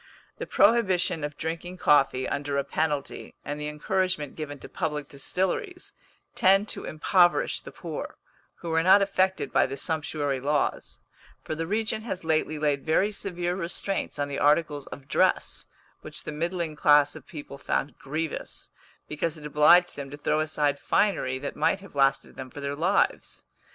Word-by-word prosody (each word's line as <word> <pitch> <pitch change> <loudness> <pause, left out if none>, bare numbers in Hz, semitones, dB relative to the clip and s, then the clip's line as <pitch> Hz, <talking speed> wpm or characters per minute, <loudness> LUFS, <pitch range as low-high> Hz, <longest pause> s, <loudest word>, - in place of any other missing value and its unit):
The - - -4
prohibition 190 -7 +3
of 145 0 -4
drinking 165 +3 -4
coffee 135 -5 +3
under 140 0 -2
a 140 - +1
penalty, 145 0 -3
and 145 +1 -4
the 150 - -3
encouragement 155 0 -1
given 145 -2 -6
to - - -10
public 150 -4 -3
distilleries, 190 - -3 0.4
tend 195 +2 +4
to - - -5
impoverish 175 +3 +2
the - - -10
poor, - - -7 0.4
who 170 -2 -5
are 165 - +3
not 190 +4 +6
affected 190 -1 0
by - - +4
the 135 - -6
sumptuary 150 -3 -1
laws; 145 +2 -1 0.5
for - - -4
the 165 +1 -3
regent 220 +2 -1
has 190 -6 -5
lately 155 -1 0
laid 145 -2 0
very 185 +6 +2
severe 180 -3 -3
restraints 190 +1 -2
on 145 0 -1
the 140 - -4
articles 150 -1 +2
of 135 -1 -10
dress, - - +1 0.3
which - - -8
the - - -5
middling 170 +1 -2
class 145 -1 +4
of - - -12
people 145 -3 -9
found 145 - -2
grievous, 155 +3 -5 0.4
because 160 +2 -2
it 150 - -11
obliged 155 +4 +5
them 140 -1 -6
to 145 - -8
throw 150 +1 0
aside 150 -2 0
finery 195 -10 +1
that 140 +2 -5
might 195 - +1
have 195 0 -14
lasted 135 -1 +1
them 130 -1 -7
for 145 - -10
their 140 0 -3
lives. 175 +7 0
155 Hz, 165 wpm, -27 LUFS, 145-180 Hz, 0.5 s, not